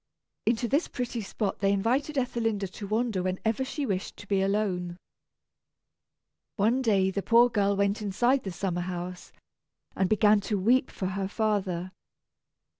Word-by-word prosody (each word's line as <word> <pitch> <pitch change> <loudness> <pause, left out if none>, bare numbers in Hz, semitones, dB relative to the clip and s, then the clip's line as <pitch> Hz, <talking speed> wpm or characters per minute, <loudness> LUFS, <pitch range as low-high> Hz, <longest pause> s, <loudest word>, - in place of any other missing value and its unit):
Into 235 +1 +2
this 285 +7 +1
pretty 245 -2 -4
spot 200 0 -3
they 195 0 +2
invited 255 +9 0
Ethelinda 225 -5 0
to 200 - -7
wander 220 -2 0
when 185 0 -1
ever 225 +4 +1
she 280 +2 -3
wished 195 -5 -3
to 205 - -12
be 195 -1 +1
alone. 190 -3 -1 1.6
One 230 +5 +2
day 195 -6 +2
the 200 - -2
poor 235 +4 +5
girl 200 -2 +2
went 200 +1 +1
inside 240 +7 +2
the 190 - -4
summer 175 0 -2
house, 180 0 -6 0.6
and 190 -1 +1
began 215 -1 +5
to 210 - +1
weep 245 +7 +3
for 190 - -5
her 195 0 -2
father. 195 -4 -1
205 Hz, 155 wpm, -28 LUFS, 190-230 Hz, 1.6 s, poor